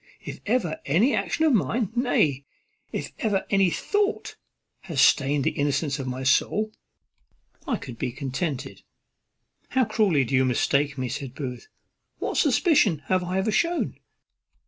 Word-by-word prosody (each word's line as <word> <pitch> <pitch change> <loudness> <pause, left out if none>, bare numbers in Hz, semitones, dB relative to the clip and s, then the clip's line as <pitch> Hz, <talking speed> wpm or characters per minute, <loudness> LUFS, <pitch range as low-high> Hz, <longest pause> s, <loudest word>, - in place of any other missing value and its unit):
If - - -7
ever 205 -9 0
any 195 - +2
action 320 - 0
of 305 - +4
mine, 215 - +1
nay, 155 - +1 0.5
if - - -4
ever 205 -4 0
any 195 -2 +4
thought, 410 - -1 0.4
had 170 -6 -8
stained 140 0 +4
the - - +1
innocence 145 0 -1
of 135 - -4
my 130 +1 -4
soul, 215 +10 +2 0.9
I - - 0
could 120 -2 -9
be 125 - -2
contented." 135 +2 -4 0.9
"How 260 -1 +2
cruelly 205 -10 +2
do 130 - -5
you 130 0 +4
mistake 140 +3 +1
me!" 130 -1 -2
said 130 +1 -6
Booth. 125 -4 -6 0.5
"What - - -3
suspicion 265 - +3
have 185 -1 +2
I 180 +1 -2
ever 200 +3 +1
shewn?" 335 - 0
160 Hz, 145 wpm, -25 LUFS, 135-215 Hz, 0.9 s, of